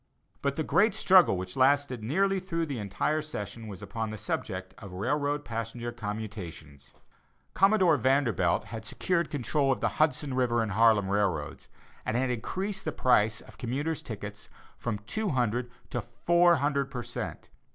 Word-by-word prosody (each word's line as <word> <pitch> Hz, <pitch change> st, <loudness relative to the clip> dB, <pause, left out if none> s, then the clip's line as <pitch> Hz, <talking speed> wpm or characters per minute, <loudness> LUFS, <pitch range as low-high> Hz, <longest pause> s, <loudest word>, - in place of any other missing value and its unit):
But 140 Hz, 0 st, 0 dB
the 160 Hz, -, -1 dB
great 200 Hz, +6 st, +3 dB
struggle 185 Hz, -, +5 dB
which 90 Hz, 0 st, -5 dB
lasted 135 Hz, -2 st, +3 dB
nearly 195 Hz, -, +2 dB
through 170 Hz, -3 st, -2 dB
the 140 Hz, -6 st, -4 dB
entire 105 Hz, +10 st, -1 dB
session 115 Hz, -6 st, -6 dB
was 100 Hz, -3 st, -8 dB
upon 110 Hz, -1 st, -3 dB
the 110 Hz, -, -5 dB
subject 95 Hz, -1 st, -3 dB
of 100 Hz, -6 st, -10 dB
railroad 145 Hz, +8 st, -1 dB
passenger 115 Hz, +1 st, -4 dB
commutations. 95 Hz, -, -7 dB, 0.6 s
Commodore 190 Hz, -5 st, +4 dB
Vanderbilt 125 Hz, -11 st, +2 dB
had 110 Hz, -2 st, -7 dB
secured 170 Hz, -, -1 dB
control 145 Hz, -1 st, +1 dB
of 130 Hz, -, 0 dB
the -, -, -1 dB
Hudson 150 Hz, -2 st, +1 dB
River 120 Hz, -2 st, +2 dB
and 110 Hz, -, -3 dB
Harlem 110 Hz, -1 st, +4 dB
railroads, 100 Hz, -1 st, -1 dB, 0.3 s
and 115 Hz, -, -1 dB
had 130 Hz, 0 st, +1 dB
increased 190 Hz, -, -3 dB
the 155 Hz, -, -2 dB
price 110 Hz, -6 st, +3 dB
of -, -, -16 dB
commuters' 140 Hz, +6 st, -2 dB
tickets 105 Hz, -1 st, -7 dB, 0.3 s
from 115 Hz, -3 st, -3 dB
two 215 Hz, -, -2 dB
hundred 125 Hz, -3 st, 0 dB, 0.2 s
to 120 Hz, -, -1 dB
four 170 Hz, +10 st, +3 dB
hundred 140 Hz, -2 st, 0 dB
per 125 Hz, -3 st, -5 dB
cent. 120 Hz, 0 st, -6 dB
125 Hz, 160 wpm, -29 LUFS, 110-150 Hz, 0.6 s, struggle